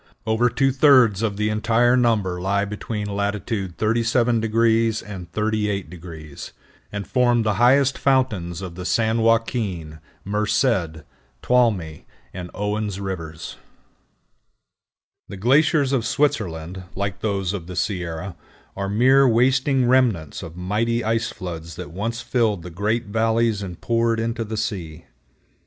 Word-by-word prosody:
Over 110 +2 +2
two 135 +3 +1
thirds 130 -7 +5
of 105 -3 -1
the 105 0 0
entire 115 +3 +2
number 105 -8 +1
lie 100 +2 +1
between 105 +1 -5
latitude 100 -2 -3
37° 115 0 +2
and 90 -4 -8
38°, 90 -8 -4 0.4
and 100 -1 -4
form 120 -2 +2
the 105 -1 +1
highest 135 +2 +4
fountains 105 -11 0
of 90 -3 -6
the 90 +1 -7
San 110 +4 +1
Joaquin, 110 - 0 0.3
Merced, 100 - 0 0.4
Tuolumne, 105 -11 +1 0.3
and 90 -1 -7
Owen's 105 -1 -2
rivers. 85 -5 -6 1.7
The 100 - -8
glaciers 140 +5 +3
of 125 -4 +1
Switzerland, 95 - -1
like 100 0 -3
those 100 -3 -1
of 90 -5 -6
the 90 - -7
Sierra, 90 -1 -3 0.4
are 100 0 -3
mere 130 +6 +5
wasting 130 +2 +3
remnants 120 - +1
of 85 +1 -9
mighty 110 +6 -1
ice 115 +1 0
floods 85 -4 -7
that 90 -1 -8
once 110 +6 -3
filled 110 -9 0
the 90 - -8
great 105 +7 -1
valleys 110 0 +1
and 90 -3 -7
poured 115 -1 +1
into 115 0 -2
the 110 0 -5
sea. 85 -7 -4
105 Hz, 130 wpm, -22 LUFS, 95-115 Hz, 1.7 s, thirds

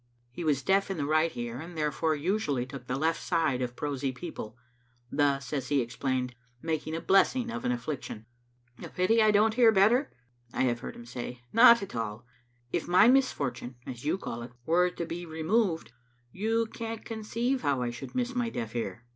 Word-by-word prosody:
He 170 - -6
was 145 -4 +1
deaf 195 +1 +2
in 195 - -2
the 145 - -1
right 155 +2 +2
ear, 120 +1 -4
and 165 +2 -8
therefore 155 +1 0
usually 150 - 0
took 130 -2 -9
the 125 - -1
left 160 +3 0
side 160 -7 +1
of 125 -1 -3
prosy 140 -2 -2
people, 125 -5 -7 0.5
thus, 140 -2 +1
as 135 -4 -2
he 145 0 +2
explained, 125 +1 -2 0.3
making 160 +1 -2
a - - -2
blessing 235 +5 +3
of 240 +2 -5
an 250 - +2
af&iction. 150 - -4 0.6
"A - - -6
pity 205 +5 +3
I 215 - +5
don't 215 +1 +4
hear 230 -1 +6
better?" 220 +7 +4 0.4
I - - 0
have 120 -2 +1
heard - - -7
him 120 - -11
say. 120 0 -7
" - - -34
Not 235 -1 +8
at 195 - -8
all. 115 0 -4 0.5
If - - -1
my 180 +5 +6
misfortune, 140 - +1
as 125 -2 -7
you 155 +5 +1
call 120 -11 -5
it, 120 +1 -9
were 180 +2 +3
to 170 - -5
be 175 +1 -6
removed, 165 - 0 0.4
you 225 - 0
can't 225 0 -6
conceive 230 +4 -2
how 135 - +1
I 120 - -1
should 125 - -9
miss 250 0 -1
my 245 -2 0
deaf 115 - -5
ear." 115 0 -4
160 Hz, 195 wpm, -29 LUFS, -, 0.6 s, Not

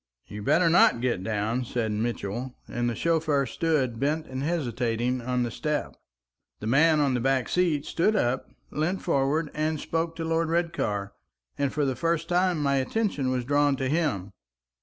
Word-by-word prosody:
"You'd 105 0 -8
better 165 +4 +4
not 165 -7 +5
get 120 -6 -1
down," 110 +4 -1
said 115 -2 -2
Mitchell; 115 +2 -3
and 120 0 -1
the 120 - -3
chauffeur 155 -3 +1
stood 130 -4 0
bent 150 +4 0
and 130 -2 -5
hesitating 125 -5 -1
on 125 +1 0
the 120 - -3
step. 150 +5 -2 0.6
The - - -7
man 150 +7 +4
on 140 -3 +2
the 125 - +1
back 130 +1 +1
seat 165 -5 +1
stood 210 +6 +1
up, 130 -9 0 0.2
leant 175 +5 -1
forward, 150 0 +1
and 155 0 -1
spoke 165 +1 -2
to 165 - -4
Lord 165 0 0
Redcar, 135 - -1 0.4
and 140 -1 0
for 150 -1 0
the 130 -2 0
first 165 +1 -1
time 180 -3 +2
my 140 -1 +2
attention 145 -1 0
was 125 -1 -1
drawn 145 +1 +3
to 135 0 -2
him. 140 - -1
140 Hz, 175 wpm, -27 LUFS, 120-165 Hz, 0.6 s, not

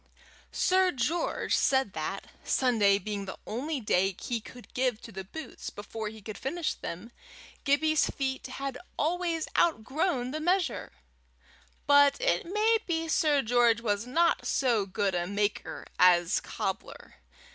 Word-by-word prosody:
Sir 370 0 +3
George 310 +6 0
said 265 -7 +2
that, 160 +5 -4
Sunday 220 -6 +3
being 205 0 -4
the 190 - -7
only 275 +7 -3
day 195 -4 +1
he 235 -2 -3
could 245 +3 -13
give 250 -3 0
to 230 - -9
the 190 -1 -6
boots, 315 +12 -8
before 215 +1 -6
he 215 -1 -9
could 215 0 -7
finish 335 +4 -2
them, 185 +8 -7 0.5
Gibbie's 310 +2 +3
feet 265 -1 -3
had 270 0 -5 0.2
always 335 0 0
outgrown 265 -2 +1
the 310 - -3
measure. 355 +2 0 0.9
But 285 - +5
it - - +1
may 430 +4 +3
be 330 -2 -1
Sir 300 -3 +3
George 235 0 +3
was 210 0 -1
not 335 +6 +2
so 235 -7 +1
good 195 0 -1
a 175 0 -1
maker 205 +1 -2
as 175 0 +5
cobbler. - - -5
250 Hz, 140 wpm, -29 LUFS, 205-315 Hz, 0.9 s, But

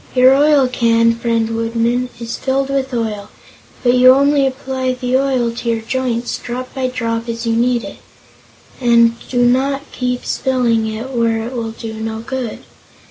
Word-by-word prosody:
Your 255 +1 +6
oil 285 -1 +4
can, 230 -2 +2
friend 230 -1 0
Woodman, 230 +2 -1
is 235 -1 -5
filled 270 +1 -1
with 270 -1 -1
oil, 215 -4 -3 0.5
but 245 -1 +4
you 255 0 +7
only 280 0 +3
apply 260 -1 -2
the 250 0 -1
oil 260 -3 +1
to 235 0 -4
your 225 -1 0
joints, 245 0 -2
drop 255 +1 -6
by 265 -2 -1
drop, 230 -2 -3
as 230 0 -4
you 230 - +1
need 240 0 +1
it, - - -8 0.8
and 235 -2 +4 0.2
do 245 -1 +2
not 270 +3 +1
keep 250 -1 -3
spilling 240 -4 0
it 220 +4 -5
where 230 -2 0
it 245 - -6
will 230 -2 -3
do 225 -1 -7
no 220 0 -4
good. 250 -1 -5
245 Hz, 170 wpm, -17 LUFS, 230-260 Hz, 0.8 s, you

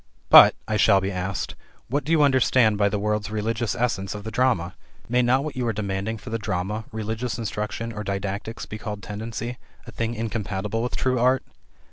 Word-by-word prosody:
"But," - - +10
I 110 - 0
shall 100 -1 +5
be 95 +1 -2
asked, 90 -4 -3 0.3
"what 145 +4 -1
do 155 - -3
you 160 -3 +5
understand 130 -5 +4
by 100 0 +2
the 105 - -1
word's 105 0 -1
religious 110 +1 -1
essence 100 -5 -1
of 105 - -7
the 110 - -5
drama? 110 -8 +1 0.3
May 125 +2 +2
not 125 +3 +3
what 155 -1 -5
you 125 -2 -1
are 115 - 0
demanding 100 +1 -3
for 110 - -10
the 115 - -1
drama, 105 +2 -3
religious 110 +2 -3
instruction, 115 +1 -4
or 105 0 -5
didactics, 100 +3 -4
be 110 - -7
called 105 -1 -6
'tendency,' 115 +4 -5 0.3
a - - -9
thing 115 0 -2
incompatible 105 -1 -3
with 125 - -2
true 130 -1 +1
art?" 130 +2 +3
110 Hz, 195 wpm, -24 LUFS, 100-120 Hz, 0.3 s, But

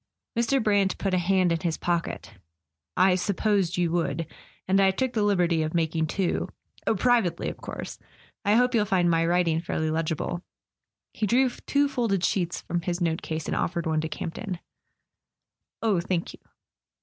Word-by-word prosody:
Mr. 235 +2 +2
Brant 200 -3 +2
put 195 -2 -1
a 185 - +3
hand 185 0 +2
in 165 - +1
his 170 -3 -1
pocket. 170 -1 -2 0.6
"I 185 0 +5
supposed 195 -1 +1
you 175 -2 +1
would. 165 -2 -1 0.4
And 195 +1 +4
I 195 - +5
took 255 +6 -1
the 220 - +1
liberty 180 -5 +2
of 155 +2 -2
making 160 -1 +1
two— 180 +2 -1 0.4
oh, 220 - +3
privately, 215 -6 +2
of - - -7
course. - - -7 0.4
I 205 +1 +3
hope 250 +2 +3
you'll 215 -3 +3
find 180 -4 +2
my 165 0 +3
writing 170 -2 +2
fairly 160 -2 -1
legible." 165 +2 -2 0.7
He 215 - -1
drew 250 +3 +3 0.2
two 285 0 +3
folded 225 -9 0
sheets 175 -3 0
from 175 0 -2
his 175 0 -2
note 165 -2 0
case, 160 -1 -4
and - - -2
offered 170 -1 -1
one 160 -1 +1
to 160 - -3
Camp 165 - -5
ton. 195 -4 -5 1.3
"Oh, 210 -5 +3
thank 175 -1 -2
you." - - -14
180 Hz, 175 wpm, -26 LUFS, 165-205 Hz, 1.3 s, I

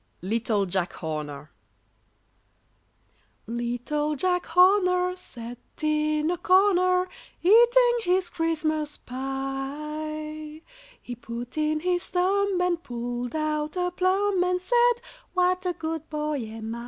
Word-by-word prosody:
Little 215 0 0
Jack 185 -1 -1
Horner 150 -2 -5 1.9
sat 235 +1 -4 2.2
in 305 +1 +1
a 355 - -1
corner, 365 -1 +4 0.4
Eating 480 +4 +6
his 365 -2 +1
Christmas 310 -2 -1
Pie; 300 +4 -5 0.4
He 245 - -7
put 235 +1 -7
in 310 0 0
his 355 0 0
thumb, 385 +1 +1
and 350 -2 +1
pulled 245 0 -4
out 305 +1 -1
a 360 0 0
plum, 375 +1 +2
And 360 0 +1
said, 485 +5 +4 0.4
"What 365 0 +2
a 360 - 0
good 320 -1 -5
boy 300 -1 -2
am 220 0 -6
I!" 235 - -5
310 Hz, 105 wpm, -26 LUFS, 270-365 Hz, 2.2 s, Eating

